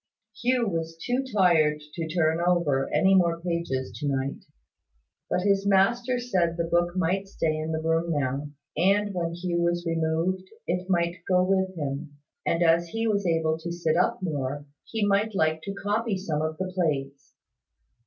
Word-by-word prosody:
Hugh 245 -1 +2
was 165 -3 -3
too 250 +7 -1
tired 165 -7 +4
to 165 -2 -3
turn 160 0 +1
over 170 -6 +2
any 190 +6 +4
more 170 -3 +3
pages 170 - -2
to 145 - -2
night: 135 0 -2 0.8
but 180 - 0
his 200 0 +2
master 235 +6 +3
said 185 -9 0
the 170 - +1
book 175 +1 +1
might 185 +3 0
stay 160 -5 -1
in 155 +1 -3
the 160 0 -2
room 165 +1 +1
now, 145 -1 -1 0.3
and 200 +4 +2
when 170 -2 -2
Hugh 175 -1 -1
was 175 0 0
removed, 165 +3 0 0.2
it 180 +2 -2
might 170 -1 0
go 180 -1 +4
with 190 0 +1
him; 145 0 -4 0.3
and, 170 +1 +2
as 170 +1 +4
he 225 +6 -2
was 200 -4 +1
able 160 -1 +1
to 170 +1 -5
sit 170 -2 0
up 180 +1 +1
more, 145 -3 -3 0.2
he 220 -2 -1
might 205 +1 +1
like 160 -2 +1
to 195 0 -4
copy 210 +1 -1
some 160 -5 -2
of 155 0 -2
the 185 0 -3
plates. 140 -6 -2
170 Hz, 175 wpm, -26 LUFS, 160-190 Hz, 0.8 s, tired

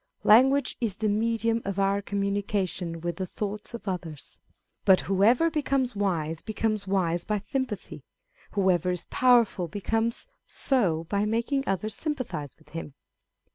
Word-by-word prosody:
Language 260 +5 +5
is 215 -5 -1
the 215 - 0
medium 225 +2 +1
of 200 -1 -3
our 195 0 +2
communication 200 -4 -2
with 175 0 -3
the 190 -1 -3
thoughts 210 +4 -5
of 230 - -10
others. 170 -6 -5 0.4
But 190 -1 +6
whoever 230 - +3
becomes 270 -5 0
wise, 165 -6 -1
becomes 215 -1 -2
wise 175 -3 +1
by 210 -2 -2
sympathy; 260 -6 -3 0.5
whoever 185 -3 +2
is 180 -1 -2
powerful, 235 -8 +4
becomes 225 +6 -1 0.2
so 185 - +1
by 200 +5 0
making 235 +6 0
others 200 +3 -1
sympathise 255 - -4
with 155 -2 -23
him. 150 -3 -7
200 Hz, 135 wpm, -27 LUFS, 180-230 Hz, 0.5 s, But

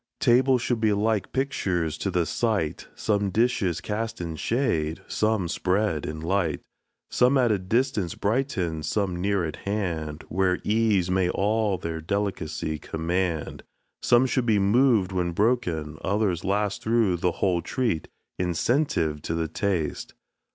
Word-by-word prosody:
Tables 125 0 +4
should 120 -3 -1
be 110 -2 +3
like 105 0 0
pictures 90 - -1
to 100 - -1
the 90 -2 +1
sight, 105 -6 -1
Some 100 -2 0
dishes 100 -5 +1
cast 110 +2 -3
in 85 -2 -4
shade, 85 - -1
some 110 -4 0
spread 90 -2 0
in 80 +1 -5
light; 85 -1 0 0.5
Some 125 +3 +4
at 125 -3 +3
a 105 - +1
distance 105 - 0
brighten, 100 - -1
some 90 +3 -1
near 95 -4 0
hand, 85 -7 -3
Where 90 -1 +1
ease 105 -4 +2
may 90 -1 +2
all 105 +1 +1
their 80 -1 -4
delicace 80 -5 -2
command; 85 -1 -2 0.4
Some 120 +1 +4
should 130 -1 0
be 110 -2 +4
moved 105 0 +3
when 90 -2 -1
broken, 85 -9 0
others 100 -2 0
last 100 +1 0
Through 110 -5 +2
the 90 0 0
whole 90 -3 +1
treat, 115 -10 -1 0.3
incentive 90 - 0
to 80 - -3
the 80 -1 -1
taste. 85 0 -2
95 Hz, 140 wpm, -26 LUFS, 85-110 Hz, 0.5 s, Tables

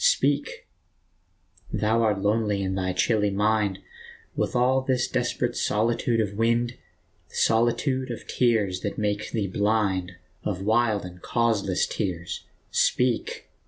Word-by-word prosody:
Speak! - - +1 1.0
thou 110 +2 +1
art 105 -3 +1
lonely 105 -1 +1
in 95 0 -1
thy 95 -1 -1
chilly 105 +2 +2
mind, 105 -1 +1 0.6
With - - -1
all 130 +2 +3
this 130 -1 0
desperate - - -1
solitude 115 +2 +1
of 105 -2 0
wind, 115 +2 +1 0.6
The - - -15
solitude 125 +3 +2
of 120 - -6
tears 110 -7 +1
that 100 - -3
make 105 0 -1
thee 110 -3 0
blind, 100 -2 0 0.3
Of 95 -2 -3
wild 110 -2 +2
and 90 0 -10
causeless 110 -6 +1
tears. 90 -3 -4 0.3
Speak 125 -2 +1
110 Hz, 125 wpm, -26 LUFS, 100-120 Hz, 1.0 s, all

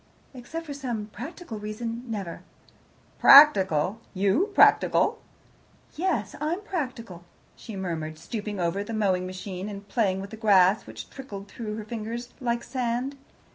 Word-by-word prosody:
"Except 320 +6 -7
for 290 - -6
some 245 -6 -4
practical 270 - -7
reason 225 +3 -5
never." 195 -6 -5 0.8
"Practical! 195 - +7
You 200 - +2
practical!" - - +4 0.7
"Yes, 300 - -1
I'm 330 +6 -1
practical," 250 - -5 0.3
she 220 - -9
murmured, 160 -4 -4
stooping 205 +3 -5
over 175 +3 0
the 225 +2 -5
mowing 185 -4 +1
machine 185 +1 -6
and 200 0 -8
playing 195 -4 +1
with 195 +1 -7
the 220 - -8
grass 200 -2 +4
which - - -9
trickled 205 -8 -8
through 215 0 -6
her 215 - -6
fingers 235 +2 -5
like 235 -2 -1
sand. 250 +2 -2
215 Hz, 135 wpm, -26 LUFS, 195-250 Hz, 0.8 s, Practical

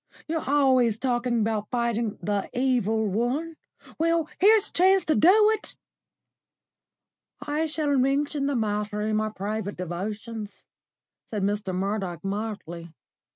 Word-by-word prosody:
You're 320 -4 -3
always 260 -6 +3
talking 240 -1 0
about 215 -1 -1
fighting 235 -3 -1
the 205 -1 -1
Evil 240 -4 +1
One. 245 - -1 0.4
Well, 330 -1 +2
here's 420 +2 +5
a - - -22
chance 375 +1 +4
to 310 - +2
do 345 - +6 0.2
it." 435 - -4 1.6
"I 305 +2 -1
shall 300 -2 0
mention 275 +2 +1
the 285 - 0
matter 210 -2 -1
in 215 0 0
my 215 0 0
private 205 0 -4
devotions," 205 +5 -6 0.6
said 210 -3 -4
Mr. 205 -1 -1
Murdoch 190 -3 -2
mildly. 195 -5 -5
225 Hz, 125 wpm, -26 LUFS, 205-285 Hz, 1.6 s, do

